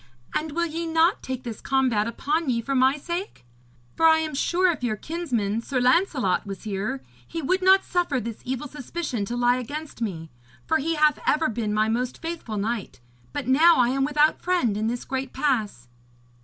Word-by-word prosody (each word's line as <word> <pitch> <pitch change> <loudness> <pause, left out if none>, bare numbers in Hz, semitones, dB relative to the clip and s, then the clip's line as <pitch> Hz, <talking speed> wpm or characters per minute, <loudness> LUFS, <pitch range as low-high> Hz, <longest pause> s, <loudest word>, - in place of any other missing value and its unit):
And 305 -1 -2
will 340 +2 +1
ye 335 +1 -4
not 325 +2 +3
take 260 -1 -5
this 230 -4 -6
combat 255 -6 +1
upon 295 +6 -1
ye 235 -2 +1
for 275 +4 -3
my 265 +2 +3
sake? 345 - -5 0.5
For 325 - +5
I 320 0 +6
am 315 -1 -2
sure 355 +6 +2
if 310 - -7
your 230 -3 0
kinsman, 235 - -2
Sir 255 +2 -2
Lancelot, 255 - +2
was 195 -1 -7
here, 195 -9 -3 0.2
he 330 - -5
would 370 +7 +1
not 380 +1 +5
suffer 350 -7 0
this 230 -1 -6
evil 260 +3 -3
suspicion 280 -5 -4
to 240 +4 -4
lie 245 +1 +3
against 290 +2 -6
me. 165 -8 -4 0.3
For 320 - +2
he 325 +3 -1
hath 300 0 +3
ever 310 0 +3
been 220 -2 -2
my 215 +1 +2
most 245 +3 -2
faithful 325 -10 -5
knight, 215 - -3 0.3
but - - -4
now 300 +1 +6
am 260 +3 +1
I - - +3
without 300 +1 +3
friend 350 - +1
in 215 +1 -1
this 240 +1 -3
great 265 0 -4
pass.' 225 - -1
265 Hz, 195 wpm, -25 LUFS, 230-320 Hz, 0.5 s, I